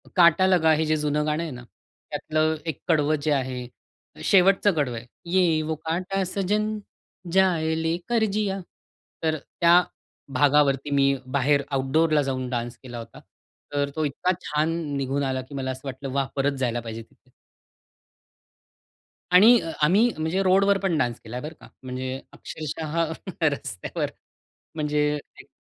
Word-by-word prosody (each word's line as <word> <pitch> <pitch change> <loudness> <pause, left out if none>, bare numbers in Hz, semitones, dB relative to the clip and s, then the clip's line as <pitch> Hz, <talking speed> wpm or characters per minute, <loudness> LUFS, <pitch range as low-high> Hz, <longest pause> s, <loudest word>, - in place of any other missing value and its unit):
काटा 170 0 +6
लगा 170 -4 +4
हे 155 +1 +1
जे 155 - +2
जुनं 150 0 0
गाणं 155 +2 0
आहे 165 - -5
ना? 125 -1 -9 0.5
त्यातलं 155 +1 0
एक 160 -4 -4
कडवं 155 -2 +3
जे 155 - 0
आहे 130 -3 -1 0.6
शेवटचं 195 +1 +5
कडवं 140 -6 -1
आहे, 115 - -8 0.3
ये 175 -4 +3
वो 155 +1 -2
काटा 185 +4 -1
सजन, 210 +3 -1 0.5
जाये 165 -4 +2
लेकर 175 +8 0
जिया! 200 -2 -1 0.6
तर 160 -1 +1 0.2
त्या 170 +1 +7 0.5
भागावरती 140 0 +3
मी 140 -1 +4 0.2
बाहेर 140 +1 +3
आउटडोरला 150 +3 +2
जाऊन 130 -2 -2
डान्स 120 -1 -3
केला 120 -2 -8
होता. 115 0 -10 0.5
तर 145 0 0
तो 155 -1 0
इतका 145 +6 0
छान 150 +2 0 0.3
निघून 140 +1 -1
आला 130 -1 -1
की 140 +2 -11
मला 130 -1 -2
असं 130 0 -8
वाटलं, 135 +1 -5
"वाह! 135 -1 0
परत 140 0 0
जायला 120 -2 0
पाहिजे 115 0 -6
तिथे." 115 +2 -22 2.0
आणि 225 +6 +8
अ, 165 - -5
आम्ही 195 +11 +5
म्हणजे 160 +5 0
रोडवर 195 +1 +4
पण 180 -5 +1
डान्स 120 -5 0
केलाय, 120 +3 -7
बरं 155 +2 -6
का? - - -14 0.2
म्हणजे 130 +1 -4
अक्षरशः 155 0 -6 0.5
रस्त्यावर. 140 - -2 0.7
म्हणजे 150 -1 -1 0.4
एक - - -23
150 Hz, 150 wpm, -25 LUFS, 135-170 Hz, 2.0 s, आणि